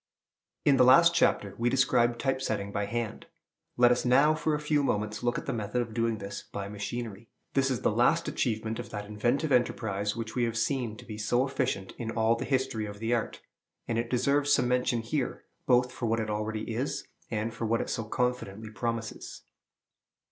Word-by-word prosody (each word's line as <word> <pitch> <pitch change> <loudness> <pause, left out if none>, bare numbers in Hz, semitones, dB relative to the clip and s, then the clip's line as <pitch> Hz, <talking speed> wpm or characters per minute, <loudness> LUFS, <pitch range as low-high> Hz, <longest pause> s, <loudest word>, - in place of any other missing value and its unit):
In 140 -2 +5
the 125 - +6
last 170 +7 +7
chapter 105 -11 +2
we 120 +1 +2
described 120 -2 +2
type 135 -1 0
setting 100 -5 -2
by 100 0 -2
hand. 115 0 -4 0.5
Let 120 0 +6
us 125 - +2
now 140 +5 +5
for 155 0 0
a - - -2
few 150 0 +1
moments 105 -5 -1
look 120 0 0
at - - -5
the - - -2
method 110 +1 -2
of 115 -2 -3
doing 115 -1 0
this 100 -1 -6
by 100 -1 -4
machinery. 105 +1 -5 0.2
This 135 -1 +2
is 130 -4 -1
the - - +2
last - - +3
achievement 110 -1 -1
of - - -6
that 105 0 -5
inventive 120 +9 0
enterprise 105 -5 +1
which 115 -1 -5
we 125 - 0
have 115 -1 -2
seen 115 -2 -1
to - - -12
be 105 -2 -7
so 120 +4 +2
efficient 130 -8 -2
in 115 -2 -3
all 115 0 +2
the 125 +3 -4
history 130 -5 0
of 105 0 -8
the 115 +3 -1
art; 115 -2 -2 0.5
and 115 -1 0
it 115 0 -2
deserves 140 +3 +2
some 125 - +4
mention 125 -1 +1
here, 125 +4 -2 0.2
both 125 0 +4
for 120 - -3
what 115 +1 +1
it 110 -1 -2
already 110 +1 -3
is, 130 +5 -3 0.2
and 110 +1 -2
for 115 0 -3
what 115 +1 +2
it - - -3
so 115 - -2
confidently 110 -2 -2
promises. 115 0 -4
115 Hz, 205 wpm, -29 LUFS, 110-125 Hz, 0.5 s, last